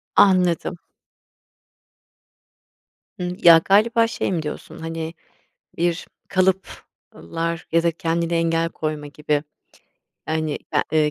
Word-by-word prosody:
Anladım. 180 -2 +3 2.4
Hımm. 180 0 -3
Ya, 165 -1 +9
galiba 230 +4 +4
şey 225 - -2
mi 170 -3 0
diyorsun? 150 -1 -7
Hani, 165 0 -5 0.6
bir 170 0 -1 0.2
kalıplar 170 - -2
ya 165 0 +3
da 170 - +3
kendine 170 +1 -1
engel 165 0 +1
koyma 155 -2 -4
gibi, 150 0 -1 0.8
hani, 155 -1 -1
a - - +3
ııı, 150 -1 +3
165 Hz, 105 wpm, -22 LUFS, 160-180 Hz, 2.4 s, Ya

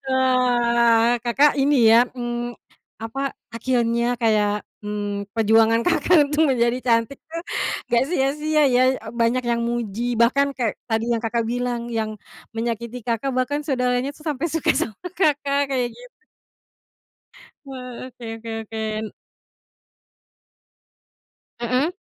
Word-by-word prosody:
wah, 240 -2 +3
Kakak 275 +4 +3
ini 285 +1 +3 0.2
ya, 240 +1 +5
mmm, 240 0 -4 0.4
apa, 225 +4 -6 0.3
akhirnya 235 0 0
kayak, 210 -3 +1 0.2
mmm, 205 -1 -4
perjuangan 225 +1 +4
Kakak 345 +4 +3 0.2
untuk 310 +1 +3
menjadi 240 -1 +2
cantik 230 +2 0
tuh, 335 +1 -5 0.5
gak 240 +2 +4
sia-sia 300 0 +1
ya, 250 -3 +3 0.2
e - - -10
banyak 240 +2 +2
yang 235 -1 0
muji, 235 0 -2
bahkan 265 +5 +3
kek, 235 -4 -2
tadi 225 0 0
yang 230 - 0
Kakak 230 0 -1
bilang, 240 -1 -3
yang 215 -1 -2 0.4
menyakiti 235 +1 -4
Kakak, 235 +2 -1
bahkan 285 +3 0
saudaranya 250 -2 0
tuh, 305 - -17
sampai 305 +1 -2
suka 325 0 +1
sama 215 -3 -2 0.2
Kakak, 285 -3 +2
kayak 250 -3 -1
gitu. - - -16 1.5
Wah, 255 -2 -8
oke 250 -1 -13
oke 225 0 -8
oke. 220 0 -8 0.2
N 215 - -7 2.5
Mmm. 255 +7 0
240 Hz, 125 wpm, -22 LUFS, 230-270 Hz, 2.5 s, ya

